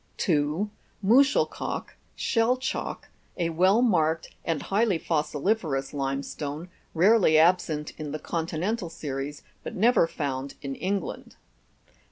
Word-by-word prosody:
2. 155 +4 +1 0.4
Muschelkalk, 270 +8 +2 0.2
(shell 235 +1 +2
chalk), 260 +1 -4 0.3
a 170 -2 0
well 185 +8 +4
marked 165 -8 +1
and 165 -3 -1
highly 205 -2 +2
fossili' 155 +3 +1
ferous 145 -11 -4
limestone, 140 +3 -3 0.3
rarely 185 -2 +5
absent 160 -2 +3
in 150 -2 -5
the 155 - -3
continental 170 +5 -2
series, 145 -2 -5 0.2
but - - -7
never 225 -3 +4
found 140 -4 -4
in 135 -1 -3
England. 195 +7 -3
165 Hz, 115 wpm, -27 LUFS, 150-200 Hz, 0.4 s, rarely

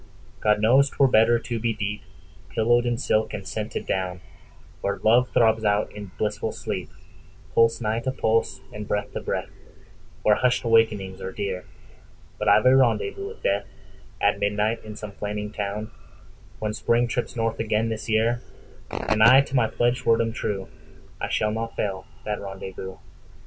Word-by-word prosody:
God 105 -1 +3
knows 130 +6 +5
'twere 135 - +3
better 120 -1 +5
to 115 0 -4
be 115 0 -1
deepPillowed 110 +3 -2
in 120 -1 0
silk 110 -4 0
and - - -7
scented - - -4
down, 90 -1 -2 0.6
Where 100 - -1
love 120 +3 +4
throbs 110 -1 +3
out 105 0 +1
in 105 -1 -8
blissful 105 0 -1
sleep, - - -4 0.6
Pulse 115 0 +4
nigh 110 0 0
to 130 +2 -2
pulse, 110 -11 0
and 105 -1 -6
breath 105 - -2
to - - -3
breath, - - -3 0.7
Where 105 - +5
hushed 125 +3 +2
awakenings 110 -5 +2
are 95 - -4
dear…But 95 -2 -8
I've - - +5
a 130 +1 +7
rendezvous 400 - +2
with 450 +2 -11
DeathAt - - -2
midnight 105 +3 0
in 110 -1 -8
some 105 -1 -7
flaming 105 +1 -4
town, 105 +2 -4 0.7
When 105 -1 -2
Spring 120 +2 +2
trips 120 +1 -3
north 115 -1 -1
again 110 0 0
this 110 +1 -5
year, 115 +2 +2 0.5
And 110 0 -1
I 130 +5 +9
to 135 -1 -5
my 120 -4 +4
pledged 120 +2 0
word 115 0 +4
am 115 -1 0
true,I 80 -8 -6
shall 105 - +1
not 115 +1 -4
fail 95 -2 -3 0.2
that 105 0 -2
rendezvous. 95 -1 -7
110 Hz, 160 wpm, -25 LUFS, 105-115 Hz, 0.7 s, I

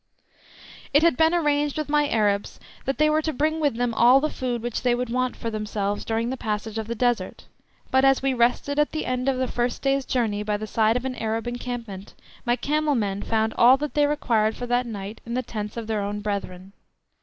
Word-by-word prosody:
It 290 - +6
had 335 -5 +4
been 320 +4 +4
arranged 295 -4 +1
with 305 - -2
my 295 0 +2
Arabs 205 -2 0 0.3
that 270 -2 -1
they 305 +2 +4
were 305 +1 +2
to 315 - -1
bring 310 +3 0
with 290 -6 +1
them 245 0 -1
all 245 +4 +6
the 305 +2 -1
food 245 -3 -3
which 240 -2 -3
they 245 -1 +2
would 245 -1 -3
want 255 0 0
for 230 - -4
themselves 210 -1 -2
during 230 +2 -1
the 265 - -3
passage 215 -1 -3
of 220 - -5
the 235 - -3
Desert, 245 0 -1 0.5
but 265 0 +4
as 270 0 +5
we 270 -1 +2
rested 250 +4 +1
at 295 - +1
the 310 - -2
end 255 +1 0
of 265 - 0
the 260 0 0
first 240 0 -2
day's 275 0 +2
journey 220 -5 0
by 210 0 -1
the 215 - -5
side 220 +1 +2
of 250 - -5
an 260 - -2
Arab 225 +1 -2
encampment, 240 -5 -6 0.3
my 240 - +3
camel 300 +2 0
men 200 -4 -1
found 220 0 0
all 250 +3 +7
that 295 +1 -4
they 295 -1 +3
required 225 -7 +1
for 245 - -5
that 245 0 0
night 205 -1 -7
in 235 +1 -5
the 255 - -1
tents 210 -2 -6
of 230 - -4
their 215 -1 -1
own 205 +1 -3
brethren. 195 -2 -5
240 Hz, 230 wpm, -24 LUFS, 220-270 Hz, 0.5 s, all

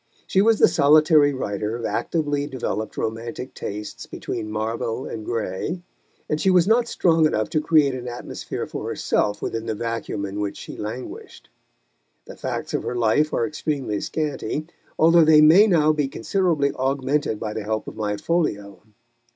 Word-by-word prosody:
She 190 - +2
was 225 +1 +4
the - - +6
solitary 150 0 +5
writer 105 -4 -3
of 120 -1 -5
actively 145 -3 -1
developed 120 -5 -4
romantic 115 +3 -4
tastes 105 +1 -6
between 105 - -5
Marvell 110 +3 -3
and 110 - -6
Gray, 115 - -3 0.4
and 150 - -1
she 190 - +3
was 180 -1 +4
not 235 +2 +3
strong 165 -7 +3
enough 110 -7 -1
to 155 - +1
create 150 -3 +3
an 125 -1 -6
atmosphere 120 0 -5
for - - -6
herself 105 0 -1
within 115 0 -3
the 110 - -1
vacuum 115 -2 -3
in 100 +1 -5
which 100 -1 -3
she - - -9
languished. 110 +4 -8 0.8
The - - -10
facts - - -4
of - - 0
her - - -4
life 120 +6 +2
are - - +1
extremely 145 -8 -3
scanty, 150 -2 -3 0.3
although 165 +1 +6
they 155 -1 +6
may 165 +8 +7
now 155 -5 +4
be 150 -2 0
considerably 155 - 0
augmented 135 -2 -1
by 105 -1 -4
the 110 -1 -4
help 110 +1 -3
of - - -7
my 105 -1 -2
folio. 105 - -2
135 Hz, 165 wpm, -23 LUFS, 110-155 Hz, 0.8 s, may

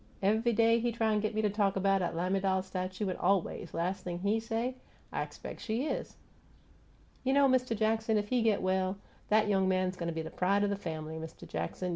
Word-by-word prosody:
Ev'y 220 +4 +3
day 230 +1 +4
he 240 +1 0
try 225 -1 +1
t' 210 - +2
git 215 0 -2
me 215 - +1
talk 205 -1 +1
'bout 195 0 +2
'at 175 -2 -1
lamiDAL 190 +2 +1
statue, 185 +2 -3
an' 185 - -2
aw 195 +2 +4
ways, 175 -1 -6
las' 180 +4 -2
thing 175 -1 -4
HE 200 +5 +1
say, 225 +3 -2 0.4
'I - - -2
expec' - - -7
she 235 +4 -2
is!' - - -3 1.1
You 265 +1 +2
know, 280 0 +6
Mist' 255 -3 +2
Jackson, 220 0 +1
if 205 0 -1
he 250 -1 +2
git 220 -4 +2
well, 185 +1 +1 0.3
'at 215 0 +4
young 195 -2 +3
man 185 0 +2
go' 175 -2 -4
be 165 -1 -3
pride 190 +5 +1
o' - - +3
the 200 - 0
family, 160 -4 -5
Mist' 160 0 -9
Jackson. 85 - -3
200 Hz, 210 wpm, -31 LUFS, 185-220 Hz, 1.1 s, know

